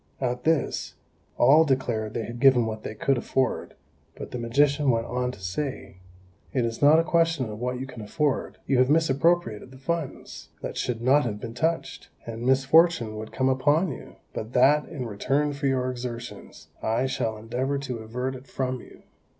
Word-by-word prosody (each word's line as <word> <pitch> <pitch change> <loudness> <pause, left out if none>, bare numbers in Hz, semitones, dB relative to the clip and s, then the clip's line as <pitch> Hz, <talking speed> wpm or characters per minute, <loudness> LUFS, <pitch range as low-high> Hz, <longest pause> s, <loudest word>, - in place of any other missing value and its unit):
At 125 0 -2
this, 160 -1 0 0.4
all 145 +6 +6
declared 120 -7 -1
they 115 - -2
had 120 0 -7
given 130 -3 +5
what 110 -1 -4
they 110 - -6
could 135 +3 +1
afford; 130 +1 -1 0.4
but - - -8
the 125 - -4
magician 140 +4 +2
went 115 -2 +2
on 125 +1 -2
to - - -13
say, 95 +4 -4 0.6
"It 125 -3 +1
is 115 0 -4
not 145 +2 +7
a 165 - +4
question 165 -5 +1
of 105 - -7
what 125 +1 -2
you 130 - -4
can 125 -4 -9
afford; 145 +6 -1
you 135 -2 +2
have 130 +1 +4
misappropriated 155 -6 +2
the 130 - -14
funds 150 +2 -5
that - - -4
should 120 -2 -2
not 140 +4 +5
have 105 -3 -3
been 115 +1 -7
touched, 160 +7 -2 0.2
and 115 0 -6
misfortune 135 -1 +3
would 110 0 -7
come 130 - 0
upon 145 +6 +2
you, - - -10 0.2
but 110 +3 -6
that, 145 +4 +4
in 145 -6 -5
return 135 +7 0
for 140 0 -2
your 130 -1 +1
exertions, 120 -1 -8
I 115 +4 +1
shall 115 -4 -2
endeavour 125 +6 -2
to 130 -4 -4
avert 125 +4 -4
it 130 +1 -11
from 130 -1 -2
you. - - -16
130 Hz, 185 wpm, -26 LUFS, 115-145 Hz, 0.6 s, not